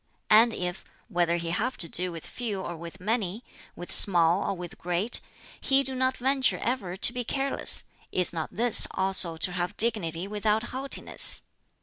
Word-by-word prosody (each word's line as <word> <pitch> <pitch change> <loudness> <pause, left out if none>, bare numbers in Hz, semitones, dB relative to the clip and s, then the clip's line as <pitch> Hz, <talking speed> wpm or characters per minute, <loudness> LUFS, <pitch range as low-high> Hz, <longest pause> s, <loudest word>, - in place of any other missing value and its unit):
And 225 +2 +5
if 180 -3 -6 0.3
whether 175 -3 -1
he 170 -1 -5
have 235 +8 -3
to 170 - -4
do 180 +2 0
with 165 -2 -10
few 220 -5 -6
or 175 - -7
with 170 +3 -12
many, 210 +1 -4 0.3
with 175 - -9
small 175 -1 +5
or 195 - -4
with 175 -1 -10
great 180 +6 -3 0.4
he 275 0 +1
do 265 0 -3
not 260 0 -2
venture 265 +1 0
ever 215 -8 -4
to 240 - +4
be 245 -1 -4
careless, 270 +3 +2 0.3
is 180 -1 0
not 160 -2 -5
this 235 +1 +5
also 190 -3 +1
to 180 - -1
have 175 0 -5
dignity 195 -6 +1
without 210 +1 -2
haughtiness? 270 +2 +4
195 Hz, 175 wpm, -25 LUFS, 175-240 Hz, 0.4 s, And